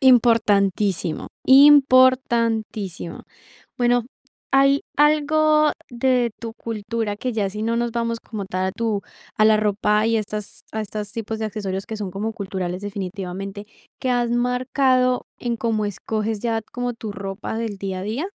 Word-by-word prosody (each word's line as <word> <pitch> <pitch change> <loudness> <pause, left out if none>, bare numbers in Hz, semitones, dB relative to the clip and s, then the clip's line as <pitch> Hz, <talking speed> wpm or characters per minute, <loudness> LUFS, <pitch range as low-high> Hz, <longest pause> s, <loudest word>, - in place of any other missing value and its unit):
Importantísimo, 205 - +3 0.2
importantísimo. 255 - +4 0.6
Bueno, 245 -1 +3 0.5
¿hay 275 +1 +4
algo 305 +1 +4 0.2
de 245 -1 +1
tu 230 -1 -6
cultura? 225 -1 -4
Que 250 +4 -3
ya 210 -3 0
si 210 +2 -5
no 230 +1 0
nos 235 0 -1
vamos, 230 -1 -2
como 210 -4 -6
tal 185 0 -2
a 190 - -2
tu 220 -2 -1 0.4
a 215 - +5
la 220 0 +6
ropa, 210 0 +1
y 230 0 +2
estas 210 -1 -6
a 220 - -2
estas 210 -1 -6
tipos 225 0 -4
de 220 - -2
accesorios, 195 -2 -4
que 220 - -5
son 205 -3 -4
como 210 +4 -3
culturales, 190 -3 -4
definitivamente, 195 0 -5 0.3
¿qué 255 - -1
has 240 -1 +1
marcado 250 +1 +1
en 240 -1 -2
cómo 220 -2 0
escoges 215 +2 -3
ya 230 -1 0
como 245 +2 -4
tu 225 -2 -7
ropa 195 +2 -5
del 225 -3 -3
día 190 -1 -4
a - - -6
día? 225 - -3
220 Hz, 155 wpm, -22 LUFS, 205-245 Hz, 0.6 s, la